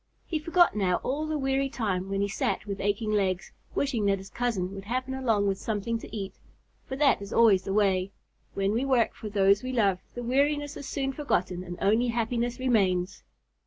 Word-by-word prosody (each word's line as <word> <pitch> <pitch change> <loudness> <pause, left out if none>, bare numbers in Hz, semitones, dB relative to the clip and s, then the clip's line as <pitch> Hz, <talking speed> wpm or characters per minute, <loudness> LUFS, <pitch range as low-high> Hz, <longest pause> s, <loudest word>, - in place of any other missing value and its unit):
He 315 - -2
forgot 340 0 +3
now 190 -4 +2
all 295 +4 -1
the 310 0 -1
weary 270 0 0
time 200 -6 -2
when 195 0 -1
he 200 - +1
sat 200 0 -1
with 200 -1 -4
aching 205 +2 0
legs, 195 -3 0 0.2
wishing 240 -7 0
that 195 0 +3
his 195 0 -11
cousin 210 -7 -1
would 195 0 -8
happen 255 +4 -2
along 230 -6 +1
with 195 -1 0
something 225 +1 -2
to - - -9
eat. 195 -2 -4 0.5
For 265 - -4
that 275 -6 +3
is 200 - -8
always 215 -5 +5
the - - -2
way, 195 -2 +2 0.5
when 195 0 +1
we 235 +4 +1
work 260 -4 +2
for 215 - -7
those 200 0 +4
we 255 - -4
love, 200 -7 +2 0.2
the 245 - -4
weariness 290 +4 +1
is 280 - -7
soon 270 -1 -2
forgotten 185 - -1
and 175 -1 -7
only 220 +5 +3
happiness 240 +1 -1
remains. 195 -7 +1
220 Hz, 200 wpm, -28 LUFS, 195-260 Hz, 0.5 s, always